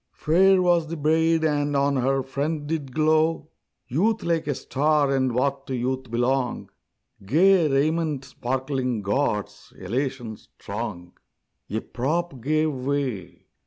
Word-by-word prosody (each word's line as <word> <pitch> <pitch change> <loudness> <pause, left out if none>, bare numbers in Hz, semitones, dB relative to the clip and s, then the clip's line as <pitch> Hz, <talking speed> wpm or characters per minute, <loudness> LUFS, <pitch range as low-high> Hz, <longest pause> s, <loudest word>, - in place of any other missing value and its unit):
Fair 185 +4 +4
was 175 -2 +3
the 165 +1 -5
bride, 160 +2 +2
and 145 -2 +1
on 140 0 +2
her 135 +1 +1
front 145 +3 -3
did 150 -3 -3
glow 155 +2 +1 0.4
Youth 210 - +1
like 165 -2 0
a 145 - 0
star; 145 +1 +1
and 130 -1 +1
what 135 +3 -1
to 130 - -2
youth 130 +1 -2
belong, 125 +2 -1 0.5
Gay 170 - +4
raiment 150 0 0
sparkling 130 -3 -2
gauds, 105 -1 -2
elation 120 +1 -3
strong. 100 -5 -7 0.6
A 110 +2 -2
prop 145 +1 -2
gave 155 +3 +1
way! 130 -8 -3
140 Hz, 125 wpm, -24 LUFS, 130-155 Hz, 0.6 s, Fair